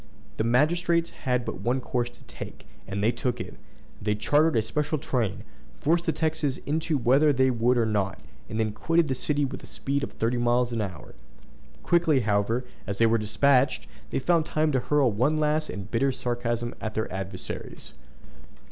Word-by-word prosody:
The - - +1
magistrates 170 +8 +2
had 125 -2 -1
but - - -5
one 120 +5 +1
course 120 -1 -1
to 120 - -17
take, - - -9 0.2
and 100 +1 -3
they 110 - +4
took 125 0 -2
it. - - -6 0.5
They 105 0 0
chartered 150 +9 +3
a 110 - +3
special 150 +7 -1
train, 120 -9 -2 0.4
forced 170 +3 +1
the - - +4
Texans 155 -3 0
into 155 +2 0
it 135 - -2
whether 140 +5 +5
they 130 -1 +3
would 120 +1 +2
or 115 - +3
no; 100 -3 0 0.4
and 110 - -3
they 110 -1 +1
quitted 165 +8 +1
the - - +2
city 145 +2 0
with 135 - -6
a - - -11
speed 140 +1 -2
of - - -4
thirty 115 +2 0
miles 120 +1 +2
an 115 - 0
hour. 95 -4 -6 0.7
Quickly, 165 -6 +3
however, 110 +3 +1 0.2
as 100 - -3
they 115 - +4
were 115 0 +3
despatched, 130 +6 +2 0.2
they - - -2
found 165 +3 +2
time 155 0 +1
to 130 - +2
hurl 140 -1 +2
one 130 +9 +1
last 155 0 +1
and 100 +1 -7
bitter 135 +4 +2
sarcasm 120 -2 -2
at 110 -1 -4
their 110 -3 -2
adversaries. 95 0 -5
125 Hz, 190 wpm, -27 LUFS, 115-150 Hz, 0.7 s, whether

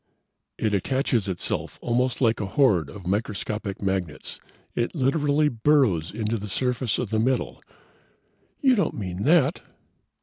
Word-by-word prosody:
"It 110 -2 0
attaches 120 +1 0
itself 90 - -3
almost 125 +2 0
like 115 -3 +3
a 100 - -2
horde 95 - +3
of 100 -3 -10
microscopic 105 0 -3
magnets. 95 -6 -3 0.3
It 120 +8 -2
literally 145 +1 +2
burrows 115 - +2
into 110 +1 -2
the 105 0 -6
surface 125 +1 0
of 110 - -3
the 110 - +1
metal." 125 +3 0 1.0
"You 265 -3 +5
don't 200 -9 +1
mean 95 0 -4
that!" 155 0 +4
115 Hz, 135 wpm, -25 LUFS, 100-135 Hz, 1.0 s, You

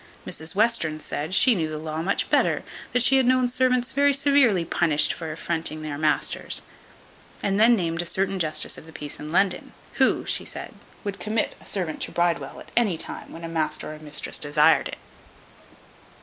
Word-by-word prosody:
Mrs 160 +2 -5
Western 205 -8 +1
said, 155 +4 -3
"she 250 +5 +6
knew 165 -6 -1
the 155 - -5
law 155 +1 -4
much 195 +4 0
better; - - +2 0.3
that 245 - +4
she 270 +1 +5
had 265 - +3
known 255 0 +3
servants 255 0 +1
very 285 +1 +3
severely 275 - +3
punished 160 -3 +2
for 160 -2 -6
affronting 160 -1 -2
their 150 -2 -4
masters;" 150 0 0 0.8
and 195 0 +1
then 235 +2 +6
named 165 -4 -1
a - - -6
certain 195 +1 -1
justice 155 -3 0
of 160 - -15
the 160 - -13
peace 150 -2 -6
in 150 - -7
London, 195 +2 0 0.3
"who," - - +3
she - - 0
said, - - -7 0.3
"would 200 -1 -5
commit 215 +1 -1
a - - -12
servant 175 -6 -3
to - - -3
Bridewell 170 -5 -1
at - - -14
any 210 -8 +2
time - - -5
when 165 - -10
a - - -4
master 160 -1 -2
or 155 - -11
mistress 150 -1 -3
desired 145 0 +4
it." - - -7
175 Hz, 190 wpm, -24 LUFS, 155-230 Hz, 0.8 s, she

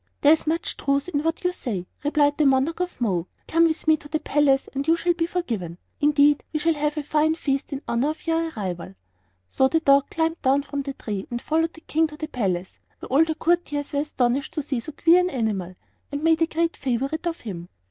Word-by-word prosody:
"There 295 +2 +7
is 320 - -1
much 330 +2 -1
truth 280 +3 0
in 290 -5 0
what 325 +3 -2
you 360 - +2
say," 210 - -4 0.2
replied 290 0 +2
the 300 - +4
Monarch 270 +5 +2
of 360 -5 -3
Mo. 185 -7 0 0.2
"Come 330 +1 +4
with 320 -1 -1
me 315 0 +5
to 295 - -13
the 310 +1 -1
palace, 280 -3 +2
and 275 +2 -3
you 330 - +5
shall 345 +1 +1
be 335 -1 -1
forgiven; 225 - -3 0.2
indeed, 290 -1 +4
we 310 - -1
shall 330 +2 +2
have 300 0 -1
a 300 - -1
fine 310 +2 +2
feast 275 -3 -2
in 275 0 -5
honor 240 +5 +1
of 310 - -6
your 330 0 0
arrival." 185 - -5 0.5
So 265 - +2
the 325 +4 +2
dog 280 -3 +4
climbed 325 +1 -1
down 275 +1 +3
from 285 0 -4
the 275 0 -5
tree 205 -6 -5
and 240 - -3
followed 325 +5 0
the 320 - -14
King 320 0 +1
to 300 0 -11
the 310 - -4
palace, 190 - -3 0.2
where - - -10
all 275 +5 +5
the 320 -1 -2
courtiers 310 -4 0
were 285 - +1
astonished 270 -2 0
to 305 - -1
see 270 -3 -2
so 310 - -7
queer 335 +4 +5
an 360 0 +1
animal, 205 - -2 0.4
and 285 +1 -4
made 325 0 +3
a 330 - +4
great 335 +1 -1
favorite 275 +6 -2
of 335 0 -3
him. 175 -6 -7
295 Hz, 235 wpm, -24 LUFS, 265-325 Hz, 0.5 s, There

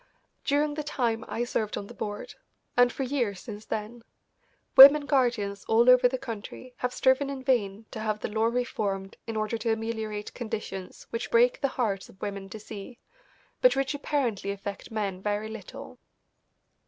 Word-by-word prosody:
During 290 +1 +1
the 300 0 -4
time 235 -6 -1
I 235 - -2
served 220 -3 -2
on 200 - -5
the - - -11
board, 205 0 -5 0.4
and 245 0 +5
for 270 - -3
years 245 -8 -1
since 215 -2 -9
then, 220 +2 -5 0.7
women 280 +2 +11
guardians 235 -8 +1
all 230 +2 +4
over 250 0 +6
the 260 +1 -2
country 250 0 -8
have 250 - -1
striven 260 +2 +2
in 270 -2 -5
vain 220 -5 0
to - - -6
have 215 -1 -1
the - - -2
law 220 +1 0
reformed 210 -5 -2
in 225 -1 -3
order 215 +1 -1
to 225 +1 0
ameliorate 220 -2 -4
conditions 210 -5 -6
which 230 +1 -3
break 240 +1 +4
the 275 - +3
hearts 200 -6 -1
of 190 - -18
women 200 -1 -5
to 220 - -8
see, 215 +3 -9 0.6
but - - +6
which 270 +1 0
apparently 270 -9 -1
affect 200 0 -5
men 200 -4 -3
very 210 +1 -2
little. 220 -3 -9
225 Hz, 170 wpm, -28 LUFS, 205-255 Hz, 0.7 s, women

